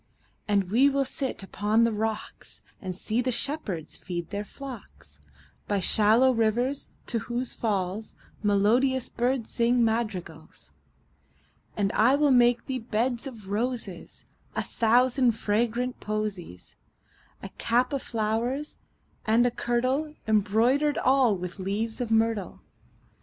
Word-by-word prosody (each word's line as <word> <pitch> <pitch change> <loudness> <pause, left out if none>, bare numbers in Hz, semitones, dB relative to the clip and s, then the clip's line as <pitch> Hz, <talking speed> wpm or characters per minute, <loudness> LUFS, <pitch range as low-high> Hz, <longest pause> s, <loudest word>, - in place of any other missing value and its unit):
And 200 -3 +1
we 260 +6 +5
will 275 0 +1
sit 265 -5 -4
upon 210 +4 +1
the 230 - +3
rocks, 220 0 -4 0.2
5 - - -15
And 185 -1 -3
see 220 +5 -1
the 255 +1 0
shepherds 225 - -3
feed 175 -1 -6
their 205 0 -3
flocks 260 +1 -10 0.5
By 205 -1 +1
shallow 220 +7 +4
rivers, 240 +4 0 0.2
to 230 - -1
whose 240 +2 -3
falls 205 -1 -2 0.3
Melodious 230 +6 +2
birds 245 0 -1
sing 235 0 +3
madrigals. 190 - -4 1.1
And 200 -1 +1
I 240 +5 +4
will 290 -1 +3
make 240 -1 +4
thee 260 -1 -3
beds 235 +3 -1
of 220 -7 -10
roses 215 -4 -4 0.3
And - - -1
a - - -15
thousand 245 +2 +3
fragrant 235 +3 -1
posies; 200 - -5 0.6
10 - - -8
A - - -39
cap 245 +3 +1
of 275 - -1
flowers, 230 +6 -2 0.5
and 230 +3 +4
a 245 - +2
kirtle 255 +6 -1
Embroider'd 225 +8 +2
all 255 -6 +3
with 180 +2 -7
leaves 215 +5 -2
of 240 - -2
myrtle. 225 -4 0
230 Hz, 135 wpm, -27 LUFS, 210-250 Hz, 1.1 s, we